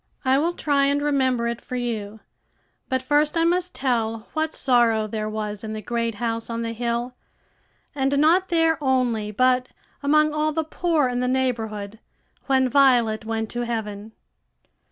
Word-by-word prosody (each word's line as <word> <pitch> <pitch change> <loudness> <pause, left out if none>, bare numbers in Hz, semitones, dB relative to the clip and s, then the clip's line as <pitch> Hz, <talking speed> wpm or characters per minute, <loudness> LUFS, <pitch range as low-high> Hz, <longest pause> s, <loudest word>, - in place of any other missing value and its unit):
I 260 +1 +4
will 335 +4 0
try 285 -2 +1
and 280 +1 +2
remember 260 -5 +1
it 235 0 -3
for 255 - -7
you; 220 -4 -4 0.7
but 260 0 -1
first 295 +4 +2
I 330 - +3
must 360 +2 0
tell 225 -4 -1
what 315 0 -1
sorrow 235 -4 +3
there 215 0 -3
was 210 -1 -4
in 215 0 -5
the 215 - -5
great 230 -1 -2
house 230 +1 -3
on 230 0 -3
the 230 0 -3
hill, 235 +1 -2 0.8
and 275 0 0
not 340 +6 +3
there 325 -2 +2
only, 245 -5 +1
but 255 +3 +2 0.3
among 305 +1 +3
all 305 0 0
the 320 +1 0
poor 315 -2 0
in 245 0 -2
the 250 - 0
neighborhood, 225 -5 -2 0.5
when 265 -1 +3
Violet 240 -5 +3
went 225 -1 -3
to 240 - -3
heaven. 220 -2 -4
250 Hz, 165 wpm, -23 LUFS, 225-285 Hz, 0.8 s, I